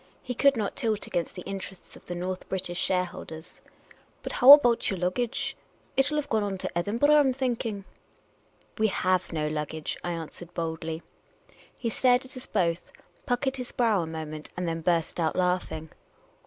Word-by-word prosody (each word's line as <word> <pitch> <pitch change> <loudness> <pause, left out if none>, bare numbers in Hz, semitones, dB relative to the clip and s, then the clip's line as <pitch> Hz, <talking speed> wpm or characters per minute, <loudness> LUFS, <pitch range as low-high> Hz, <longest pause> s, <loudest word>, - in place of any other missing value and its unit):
He 250 - -3
could 280 +1 +4
not 210 -3 -2
tilt 220 -5 -1
against 170 -1 -2
the 180 - -7
interests 195 -1 -7
of - - -16
tlie 175 - -4
North 185 +1 -4
British 180 -2 -3
shareholders, 175 -3 -3 0.6
"But - - -4
how 265 +3 +11
about 245 -5 +5
yer 195 - -1
luggage? 185 +7 -1 0.4
It 270 +1 +3
'11 300 - -1
have - - -19
gone 220 - +3
on 200 -2 -2
to 185 - -5
Edin 205 +6 -1
burgh, 290 +4 +4
I 300 - +7
'm 270 -3 +3
thinking." 235 -6 -2 0.5
" - - -36
We 220 - +4
have 185 -2 +1
no 155 -2 -1
luggage," 150 0 -3
I 175 - -2
answered 165 +1 -8
boldly. 160 0 -3 0.7
He 235 -3 -2
stared 250 +2 +3
at 260 +2 -9
us 255 - -8
both, 175 -4 0 0.4
puckered 265 +2 0
his 250 -1 -5
brow 225 -6 +2
a 165 - -4
moment, 155 -1 -6
and 180 -1 -2
then 165 0 -2
burst 170 0 0
out 160 -2 +1
laughing. 180 -3 -1
185 Hz, 185 wpm, -27 LUFS, 170-240 Hz, 0.7 s, how